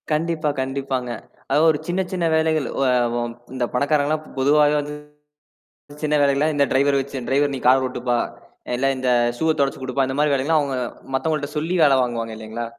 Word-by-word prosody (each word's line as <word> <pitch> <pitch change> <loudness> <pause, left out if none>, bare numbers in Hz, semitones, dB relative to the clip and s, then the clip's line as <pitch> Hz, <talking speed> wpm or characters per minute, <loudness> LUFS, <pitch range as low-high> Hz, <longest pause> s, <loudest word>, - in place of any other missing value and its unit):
கண்டிப்பா, 155 0 0
கண்டிப்பாங்க. 135 -1 -3 0.4
அதாவது 145 +4 +3
ஒரு 145 - -3
சின்ன 180 +2 0
சின்ன 180 -3 -1
வேலைகள். 160 -2 +1
ஒ - - +1 0.3
வம் 120 0 -2 0.2
இந்த 130 -2 -1
பணக்காரங்க 145 +3 +1
எல்லாம் 155 0 -1
பொதுவாக 145 +2 +4
வந்து 145 0 -5 1.1
சின்ன 150 0 +1
வேலைக்கெல்லாம் 140 +2 +2
இந்த 140 -1 +3
ட்ரைவர் 140 +1 +3
வச்சு 135 0 -5
"ட்ரைவர் 140 +1 +1
நீ - - -5
கார் 130 +1 +5
ஓட்டுப்பா! 125 -1 -1 0.6
இல்ல 130 +2 0
இந்த 130 0 -1 0.3
ஷூவ 160 +5 0
தொடச்சு 135 -1 0
குடுப்பா" 130 +1 0
இந்தமாரி 145 +3 +1
வேலை 135 -1 0
எல்லாம் 160 +1 +3
அவுங்க, 140 -2 -2 0.4
மத்தவங்கள்ட 150 0 -1
சொல்லி 165 +4 -1
வேலை 140 -3 +5
வாங்குவாங்க 115 -2 -2
இல்லேங்களா! 110 +2 -6
140 Hz, 175 wpm, -22 LUFS, 130-150 Hz, 1.1 s, கார்